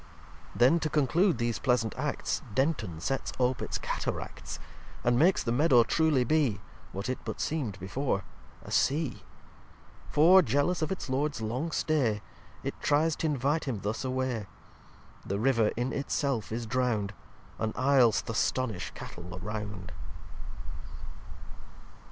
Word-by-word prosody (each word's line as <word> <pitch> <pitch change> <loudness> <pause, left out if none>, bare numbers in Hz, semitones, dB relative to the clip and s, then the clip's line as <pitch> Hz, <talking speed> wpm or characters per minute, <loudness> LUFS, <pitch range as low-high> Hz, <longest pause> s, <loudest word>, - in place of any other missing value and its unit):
lix - - -17
Then, 130 +8 +6
to 155 - -1
conclude 155 - +3
these 120 -1 -1
pleasant 120 -5 +1
Acts, - - -2
Denton 130 - 0
sets 135 +10 -2
ope 125 -1 +1
its - - -2
Cataracts; - - -4 0.5
And 120 0 +3
makes 180 +5 +4
the 115 - -1
Meadow 125 -2 +5
truly 155 -1 +2
be 130 -6 +2 0.3
(What 100 +3 -4
it 130 - -2
but - - -5
seem'd 125 -11 -2
before) 100 +2 -1 0.4
a - - -10
Sea. 145 0 +1 0.9
For, 175 +6 +7
jealous 145 +6 +1
of 155 - -1
its 190 - -3
Lords 140 0 0
long 120 +9 -2
stay, 130 -11 +1 0.4
It - - -2
try's 155 +2 +3
t'invite 150 0 0
him 120 -8 -3
thus 105 +2 -2
away. 130 -5 -1 0.8
The 100 - -2
River 115 -1 +3
in 125 +2 -1
it 140 - -3
self 130 -8 0
is 115 +1 -2
drown'd, 110 -4 0 0.5
And 110 0 0
Isl's 130 -2 +4
th' - - -4
astonish 115 -2 0
Cattle 90 +1 -8
round. 105 -2 -5
130 Hz, 140 wpm, -29 LUFS, 110-145 Hz, 0.9 s, For